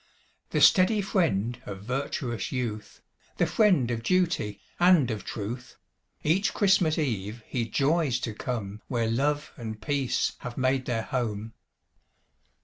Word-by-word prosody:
The - - 0
steady 210 +2 +6
friend 125 - 0
of 100 -1 -7
virtuous 125 -1 -3
youth, 110 -5 -4 0.4
The - - +3
friend 180 - +3
of 115 -1 -2
duty, 165 - +1 0.2
and 175 -8 +5
of 110 -2 -4
truth, 120 +4 -6 0.5
Each 185 +7 +2
Christmas 190 -6 +3
eve 110 - -2
he 115 -3 -2
joys 140 0 +2
to 115 - -3
come 105 -3 -4
Where 120 -3 0
love 145 +6 0
and 110 -3 -6
peace 135 +3 0
have 125 -1 -7
made 130 0 +1
their 115 -2 -1
home. 110 -4 -3
125 Hz, 135 wpm, -27 LUFS, 110-150 Hz, 0.5 s, steady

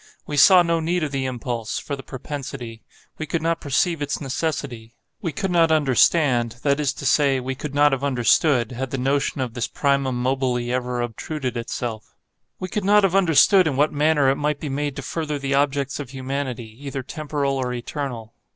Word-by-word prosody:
We 150 - -4
saw 180 +5 +7
no 170 -1 +1
need 170 +1 0
of 150 - -2
the 135 -1 -2
impulse—for 120 +1 -4
the 135 - -9
propensity. 130 -4 -7 0.4
We 155 - -4
could 160 +1 -2
not 165 0 0
perceive 150 +3 0
its 145 -1 -2
necessity. 135 -5 -4 0.3
We 170 -6 -2
could 195 +2 -3
not 165 -2 +4
understand, 135 -4 +3
that 140 0 +2
is 145 -3 +1
to - - -8
say, 140 -3 +3
we 130 +1 -3
could 140 +1 -7
not 145 0 +5
have 135 0 -1
understood, 130 -1 +2
had 130 +1 -4
the 135 - -3
notion 135 +1 0
of 125 -3 -3
this 120 -1 -2
primum 140 -3 0
mobile 130 0 0
ever 125 0 -2
obtruded 125 +3 -4
itself;—we 115 +9 -7
could 210 +2 -3
not 205 +1 +5
have 190 -2 +2
understood 185 0 +5
in 140 - -1
what 145 +3 +2
manner 150 -1 +3
it 135 - -1
might 150 0 -1
be 150 - -5
made 145 0 -2
to 140 - -6
further 150 +1 -3
the 140 0 -2
objects 140 0 0
of 140 -4 -6
humanity, 130 -4 -5
either 135 -1 -4
temporal 140 -1 -2
or 125 -1 -2
eternal. 120 -2 -5
140 Hz, 190 wpm, -22 LUFS, 125-150 Hz, 0.4 s, saw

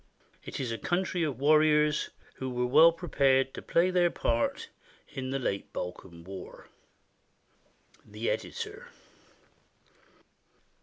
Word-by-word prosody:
It - - -6
is 125 -4 -2
a 115 - -4
country 180 0 -1
of 150 -7 -1
war 150 +2 +5
riors, 150 -1 +2 0.3
who 130 - -4
were 125 0 -1
well 155 +7 +7
prepared 135 -6 +1
to - - -7
play 175 +2 +2
their 175 -1 +3
part 115 -7 -1 0.4
in 130 -1 -6
the 135 - -1
late 100 -7 -3
Balkan 90 -1 -7
War. 95 +1 -10 1.3
The 105 +3 -3
Editor. - - -5
135 Hz, 120 wpm, -29 LUFS, 115-155 Hz, 1.3 s, well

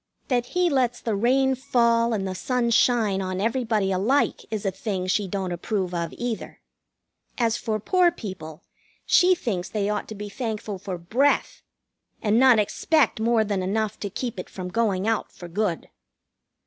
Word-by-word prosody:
That 245 -2 +1
He 360 0 +4
lets 255 -6 +1
the 225 -3 -2
rain 265 +5 +3
fall 235 -2 +2
and 195 -4 -2
sun 240 +4 0
shine 225 -5 +3
on 185 0 -3
everybody 220 -3 0
alike 220 +10 +1
is 215 -2 -4
a 195 - +1
thing 190 -1 -3
she 195 +2 0
don't 190 -1 -3
approve 180 +1 -2
of 170 -1 -2
either. 240 -2 -4 0.8
As 230 -2 +2
for 220 -2 -2
poor 360 - +3
people, 185 - -8 0.4
she 365 0 +5
thinks 195 - -3
they 205 -2 -1
ought 210 - -3
to 215 - -7
be 210 0 -6
thankful 215 -3 -4
for 185 -1 -5
breath, 240 +12 +1 0.6
and 215 +2 +2
not 260 -2 +6
expect 250 +5 +2
more 225 0 +3
than 205 -3 -1
enough 210 +3 -1
to 200 - -4
keep 235 0 -4
it - - -7
from 185 -1 -6
going 200 -1 0
out 225 -1 0
for 175 - -10
good. 180 -1 -2
215 Hz, 170 wpm, -24 LUFS, 190-240 Hz, 0.8 s, not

